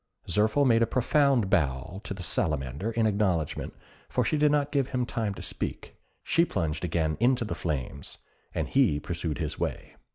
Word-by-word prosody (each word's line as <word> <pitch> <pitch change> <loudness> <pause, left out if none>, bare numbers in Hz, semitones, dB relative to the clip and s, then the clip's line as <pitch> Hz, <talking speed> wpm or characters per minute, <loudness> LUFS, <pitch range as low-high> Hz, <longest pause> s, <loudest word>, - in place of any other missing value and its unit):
Zirphil 110 - +3
made 115 -3 +4
a 115 - +4
profound 135 -3 +3
bow 80 - 0
to 100 - -4
the 95 - -5
Salamander 75 - -1
in 115 -1 +1
acknowledgment, 100 -7 0 0.3
for - - +1
she - - +1
did 150 -1 +4
not 145 -1 +1
give 140 -3 +1
him 125 -2 -1
time 110 -4 -2
to - - -8
speak; - - -5 0.3
she 165 - +3
plunged 80 - -2
again 80 -2 0
into 120 +1 +3
the 110 - -3
flames, 70 -3 -4 0.3
and - - -2
he 120 - +3
pursued 80 -3 -3
his - - -3
way. - - -4
100 Hz, 175 wpm, -28 LUFS, 80-125 Hz, 0.3 s, made